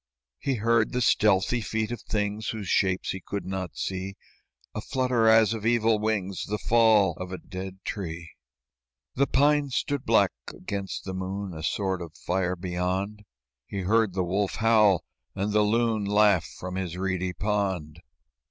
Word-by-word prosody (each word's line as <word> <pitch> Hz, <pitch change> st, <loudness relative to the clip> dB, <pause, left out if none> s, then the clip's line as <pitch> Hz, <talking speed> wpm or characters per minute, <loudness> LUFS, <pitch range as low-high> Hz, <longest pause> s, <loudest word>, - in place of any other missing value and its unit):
He 135 Hz, -2 st, -1 dB
heard 115 Hz, 0 st, +2 dB
the 125 Hz, -, 0 dB
stealthy 105 Hz, +3 st, +3 dB
feet 110 Hz, +1 st, -2 dB
of 120 Hz, -, -5 dB
things 105 Hz, 0 st, -2 dB
Whose 105 Hz, -4 st, -4 dB
shapes 95 Hz, 0 st, +1 dB
he 95 Hz, -, -5 dB
could 100 Hz, -, -4 dB
not 95 Hz, -2 st, -4 dB
see, 95 Hz, +1 st, -3 dB, 0.6 s
A 110 Hz, -, -4 dB
flutter 125 Hz, -2 st, +1 dB
as 110 Hz, -1 st, +6 dB
of 110 Hz, -2 st, -5 dB
evil 115 Hz, -1 st, +3 dB
wings, 100 Hz, -3 st, -1 dB
The 105 Hz, -, -1 dB
fall 110 Hz, -4 st, +4 dB
of 90 Hz, 0 st, -6 dB
a 95 Hz, -, -4 dB
dead 95 Hz, +1 st, -7 dB
tree. 85 Hz, -4 st, -5 dB, 0.8 s
The 140 Hz, +2 st, +2 dB
pines 145 Hz, -1 st, +2 dB
stood 145 Hz, -2 st, -1 dB
black -, -, +4 dB, 0.2 s
against 100 Hz, 0 st, -5 dB
the 95 Hz, -, -4 dB
moon, 95 Hz, +1 st, -4 dB
A 80 Hz, -, -7 dB
sword 95 Hz, +2 st, -1 dB
of 80 Hz, -2 st, -9 dB
fire 90 Hz, 0 st, -1 dB
beyond; 95 Hz, +4 st, -3 dB, 0.4 s
He 100 Hz, -, -4 dB
heard 105 Hz, 0 st, +2 dB
the 95 Hz, -, +1 dB
wolf 95 Hz, +3 st, -1 dB
howl, 105 Hz, -5 st, +4 dB, 0.3 s
and 105 Hz, +2 st, -1 dB
the 105 Hz, -, +4 dB
loon 110 Hz, 0 st, +1 dB
Laugh 105 Hz, -4 st, +4 dB
from 90 Hz, 0 st, -5 dB
his 90 Hz, -2 st, -4 dB
reedy 95 Hz, -1 st, -1 dB
pond. 95 Hz, -7 st, -2 dB
100 Hz, 160 wpm, -27 LUFS, 95-110 Hz, 0.8 s, as